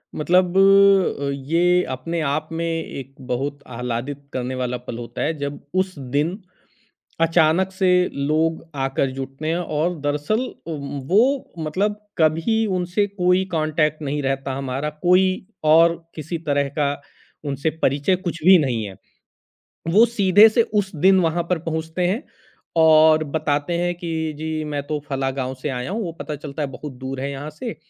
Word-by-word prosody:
मतलब 180 +3 +2
अ, 195 -7 +5 0.2
ये 180 +2 +3
अपने 130 +7 -3
आप 155 +2 -1
में 165 +1 -2
एक 140 -5 -5
बहुत 140 +3 -2
आह्लादित 125 +3 -4
करने 130 0 -3
वाला 125 -1 -2
पल 115 - -5
होता 120 -1 -6
है 160 - +1
जब 140 0 -4
उस 185 -2 0
दिन, 145 +8 -1 0.8
अचानक 165 +3 +3
से 190 -1 +1 0.2
लोग 155 +3 0
आकर 135 0 0
जुटने 135 +4 -4
और 170 -1 -1
दरअसल 150 +9 0 0.3
उम, 145 -3 -5
वो 250 +8 +2
मतलब 190 +7 -1 0.2
कभी 165 +8 +2
उनसे 180 +3 0
कोई 185 -1 +2
कॉन्टैक्ट 155 -1 0
नहीं 145 0 -2
रहता 135 0 -2
हमारा। 135 +2 -3
कोई 180 +1 +5 0.4
और 165 +2 +5 0.2
किसी 160 +2 -4
तरह 140 -1 +1
का 140 -1 +2 0.5
उनसे 140 +2 -1
परिचय 145 +7 +2
कुछ 175 -4 -5
भी 185 0 +9
नहीं 115 -4 -1
है। 95 -2 -8 1.0
वो 220 +4 +7
सीधे 205 -1 +6
से 230 +2 +3
उस 195 -2 0
दिन 190 +4 +5
वहाँ 170 0 +1
पर 180 - +2
पहुँचते 160 +2 -2
हैं 200 +7 -1 0.5
और 155 -1 +6
बताते 150 +2 -1
हैं 175 0 0
कि 160 -2 -3
जी, 155 0 -3
मैं 145 -1 -3
तो 150 0 -2
फला 135 -1 -1
गाँव 130 -1 -3
से 150 - -1
आया 125 +3 -3
हूँ, 220 +2 -2
वो 165 - -4
पता 150 - -4
चलता 145 +1 -6
है 140 - -1
बहुत 140 +2 -8
दूर 130 +1 -6
है 140 +1 -2
यहाँ 145 +2 -6
से 160 - -6
155 Hz, 160 wpm, -22 LUFS, 140-180 Hz, 1.0 s, भी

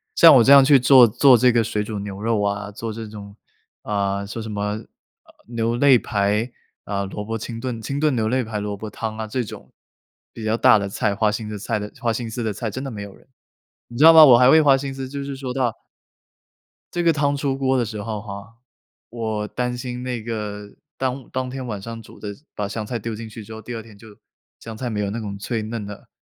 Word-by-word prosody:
像 165 -3 +9
我 120 - +6
这 135 - +5
样 140 -1 +9
去 140 -1 +6
做 125 -1 +7
做 125 +3 +5
这 125 +2 +4
个 115 -1 +2
水 105 -1 -2
煮 105 -1 -5
牛 100 0 -7
肉 110 -1 0
啊， 100 0 -2
做 115 +2 -5
这 110 0 -7
种， 100 -1 -10 0.5
啊， 100 -1 -1
说 110 +3 -6
什 110 0 -6
么， 100 -1 -4
啊 105 - -1 0.5
啊 - - -21 0.2
牛 115 0 -1
肋 130 -2 +6
排， 105 +3 0 0.3
啊， 100 -1 -2
萝 105 +2 -6
卜 115 +1 -4
清 115 +1 -6
炖 120 -2 -4
清 140 +6 -3
炖 150 -3 +2
牛肋排 110 -1 -1
萝 105 0 -3
卜 110 +2 -7
汤 110 +1 -5
啊 110 - -3
这 125 +3 -2
种， 105 - -11 0.6
比 115 - -8
较 110 +1 0
大 125 -4 +6
的 100 0 -3
菜 105 +1 -1
花 105 +1 +2
心 105 0 -4
的 105 - -5
菜 105 - -2
的 105 0 -6
花 120 -2 +1
心 115 0 -4
思 120 +1 -4
的 110 - -1
菜， 110 +2 -4
真 130 +6 -5
的 135 - -4
没 105 -3 -7
有 100 -1 -10
人。 - - -23 0.6
你 120 - -10
知 145 - +3
道 165 - +11
吗？ 160 -1 +10
我 125 -4 +8
还 125 +1 +6
会 160 +1 +7
花 140 -2 +5
心 135 0 -5
思 135 -1 -6
就 140 0 -5
是 140 -1 -5
说 130 -2 -5
到 125 -3 0 1.2
这 175 - -1
个 165 -1 +4
汤 145 -1 +1
出 135 -1 -1
锅 135 -1 +1
的 120 - +1
时 105 -1 -6
候 105 -1 -4
哈， 100 +2 -10 0.5
我 110 -2 -3
担 125 +1 -3
心 125 0 -5
那 125 -3 -3
个， 105 -2 -6 0.2
当 130 0 -3
当 130 0 -3
天 130 0 -6
晚 105 -5 -5
上 115 +2 -7
煮 - - -15
的 105 - -7 0.3
把 105 - -3
香 105 +1 -5
菜 120 +1 -4
丢 115 +1 -5
进 110 +1 -8
去 110 0 -9
之 110 - -10
后， 110 - -8
第 120 +3 -8
二 115 - -5
天 110 -2 -16
就 110 - -15 0.5
香 115 -1 -9
菜 125 +2 -4
没 105 -2 -3
有 100 -1 -1
那 115 +3 -4
种 100 -2 -6
脆 110 +2 -3
嫩 110 -1 -5
的、 105 0 -10
115 Hz, 270 characters per minute, -22 LUFS, 105-125 Hz, 1.2 s, 道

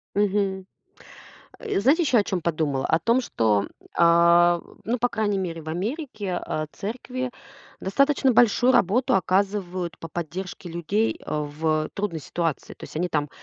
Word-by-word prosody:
Мгм. 195 -2 0 0.9
Э, - - -1
знаете 280 - +4
еще 265 -6 +3
о 210 - +4
чём 185 -3 -2
подумала? 155 -5 -1
О 160 - +2
том, 235 +8 +2
что, 105 - +1 0.3
а, 170 0 +5 0.2
ну, 240 +3 -1
по 245 - +2
крайней 210 -3 0
мере, 170 -3 -3
в 155 - -8
Америке, 215 - -4
а, 155 - -3
церкви 255 +4 -4 0.5
достаточно 275 +6 +2
большую 240 +2 +4
работу 230 +7 +3
оказывают 185 -2 0
по 165 - -7
поддержке 175 +2 -6
людей, 180 +7 -1
э, 150 - -2
в 155 +1 -1
трудной 195 -6 -3
ситуации. 165 0 -3
То - - -15
есть - - -10
они 180 +2 0
там 150 -2 -1
185 Hz, 150 wpm, -24 LUFS, 165-220 Hz, 0.9 s, а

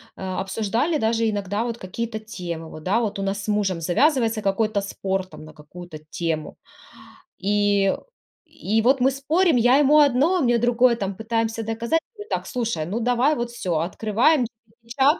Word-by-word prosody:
А, 190 0 -4
обсуждали 225 - -1
даже 225 -2 +1
иногда 205 +1 -2
вот 235 -1 -4
какие-то 220 +4 -5
темы, 170 -7 -7
да, 195 +7 +1
вот 210 -4 -2
у - - -2
нас 195 +1 -2
с - - -8
мужем 205 -4 0
завязывается 230 - +2
какой-то 205 +1 0
спор 195 -1 -3
там 185 -4 -12
на 155 - -13
какую-то 155 +1 -11
тему. 160 -2 -3 0.8
И 205 0 +2 0.5
и 220 +2 -1
вот 260 +3 +3
мы 265 +2 +4
спорим, 310 +4 +2
я 245 +3 +5
ему 295 +1 +5
одно, 285 +5 +4
он 345 - +1
мне 240 0 +3
другое, 240 +1 +3
там, 195 -3 -3
пытаемся 225 0 -2
доказать. 230 +9 -1 0.2
Мы: 415 - -8
"Так, - - -2
слушай, 230 - -2
ну 205 +7 -3
давай 250 +5 +2
вот 235 -1 -3
всё". 180 -8 -2
Открываем 225 - +2
GPT-чат 235 +5 -1
225 Hz, 170 wpm, -23 LUFS, 195-245 Hz, 0.8 s, я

